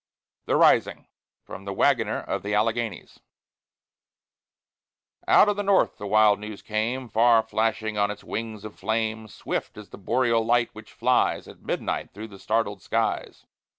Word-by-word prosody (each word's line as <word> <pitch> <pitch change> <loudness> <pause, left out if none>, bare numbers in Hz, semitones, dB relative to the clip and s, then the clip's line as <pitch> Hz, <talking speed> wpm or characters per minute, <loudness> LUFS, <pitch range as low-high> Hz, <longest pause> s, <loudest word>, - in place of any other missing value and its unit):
THE - - +2
RISING - - +3 0.4
From 95 - -10
"The 100 - -4
Wagoner 115 -5 +2
of 100 - -4
the 105 +2 -2
Alleghanies" 115 +1 -2 2.1
Out - - +6
of 205 -1 0
the - - 0
North 195 -1 +2
the 105 - -5
wild 105 0 +4
news 105 -1 -8
came, 115 +4 -2
Far 115 0 +4
flashing 110 -1 -1
on 100 0 +2
its 105 0 -7
wings 110 -2 -5
of 110 - -9
flame, 110 0 -2
Swift 105 - -5
as 105 -1 -11
the - - -12
boreal 115 +2 +1
light 120 +1 +2
which 110 +1 -12
flies 125 +2 +1
At - - -14
midnight - - -3
through 110 +2 -8
the 100 -2 -13
startled 105 -3 -1
skies. - - -2
110 Hz, 155 wpm, -25 LUFS, 105-115 Hz, 2.1 s, Out